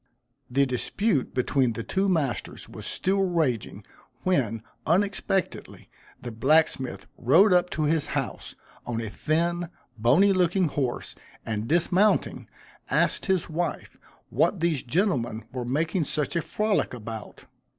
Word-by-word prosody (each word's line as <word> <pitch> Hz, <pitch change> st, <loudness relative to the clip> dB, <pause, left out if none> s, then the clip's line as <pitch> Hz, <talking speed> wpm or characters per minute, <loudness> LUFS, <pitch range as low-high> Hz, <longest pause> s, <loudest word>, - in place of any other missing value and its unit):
The 140 Hz, +3 st, +3 dB
dispute 135 Hz, -, -1 dB
between 130 Hz, -1 st, +1 dB
the 115 Hz, -, -5 dB
two 195 Hz, -, 0 dB
masters 150 Hz, -9 st, -1 dB
was -, -, -9 dB
still 195 Hz, +1 st, 0 dB
raging, 160 Hz, -, -1 dB, 0.4 s
when, 115 Hz, -, 0 dB, 0.2 s
unexpectedly, 195 Hz, +2 st, -1 dB, 0.3 s
the 120 Hz, -, -7 dB
blacksmith 135 Hz, +3 st, +1 dB
rode 175 Hz, -, +5 dB
up 180 Hz, 0 st, +3 dB
to 155 Hz, -, -2 dB
his 155 Hz, 0 st, +1 dB
house, -, -, -4 dB, 0.3 s
on 120 Hz, -2 st, -3 dB
a 110 Hz, -2 st, -4 dB
thin, 170 Hz, +6 st, -1 dB, 0.3 s
bony 155 Hz, -, +5 dB
looking 180 Hz, -1 st, +2 dB
horse, 130 Hz, -4 st, -2 dB, 0.3 s
and 110 Hz, 0 st, -3 dB
dismounting, 180 Hz, -, +2 dB, 0.4 s
asked -, -, +1 dB
his 190 Hz, -3 st, +1 dB
wife 170 Hz, +2 st, -3 dB, 0.4 s
what 195 Hz, -, +2 dB
these 165 Hz, -5 st, +1 dB
gentlemen 125 Hz, -, 0 dB
were 125 Hz, -1 st, -4 dB
making 155 Hz, +6 st, 0 dB
such 150 Hz, +3 st, -2 dB
a 170 Hz, -, +2 dB
frolick 210 Hz, -, 0 dB
about. 110 Hz, -2 st, -8 dB
155 Hz, 130 wpm, -26 LUFS, 125-180 Hz, 0.4 s, rode